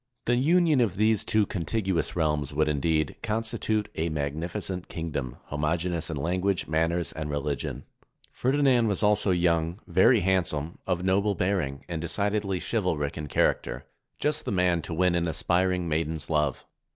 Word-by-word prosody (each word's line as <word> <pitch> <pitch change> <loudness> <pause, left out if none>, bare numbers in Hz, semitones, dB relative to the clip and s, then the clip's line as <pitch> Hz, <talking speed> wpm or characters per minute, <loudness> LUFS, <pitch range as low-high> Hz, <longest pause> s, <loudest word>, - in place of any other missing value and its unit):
The 120 - +3
union 155 +1 +3
of 105 -6 +1
these 110 0 +3
two 110 -1 +2
contiguous 95 0 -1
realms 75 -4 0
would, 75 0 +2
indeed, 75 +1 0
constitute 110 -1 -1
a 80 +1 -1
magnificent 85 +6 -3
king 80 -1 -5
dom, 65 -4 -4
homogeneous 80 +3 -1
in 80 - -3
language, 90 +5 0
manners, 80 +1 0
and 75 -1 -5
religion. 75 0 -3 0.5
Ferdinand 130 -3 +2
was 105 0 0
also 105 -1 +3
young, 85 -1 +1
very - - +4
handsome, 85 -4 0
of 90 -1 0
noble 100 +2 +2
453 90 -3 +1
SPAIN 70 0 -8
bearing, - - -28
and 85 -2 -4
decidedly 100 +2 -1
chivalric 85 -11 -1
in 75 -2 -5
character - - 0 0.2
— - - -51
just 150 +1 0
the - - -2
man 90 -3 +2
to 85 - -6
win 90 +1 +3
an 85 0 +1
aspiring 90 +2 +1
maiden's 80 -1 -2
love. 75 -3 0
85 Hz, 165 wpm, -27 LUFS, 80-100 Hz, 0.5 s, very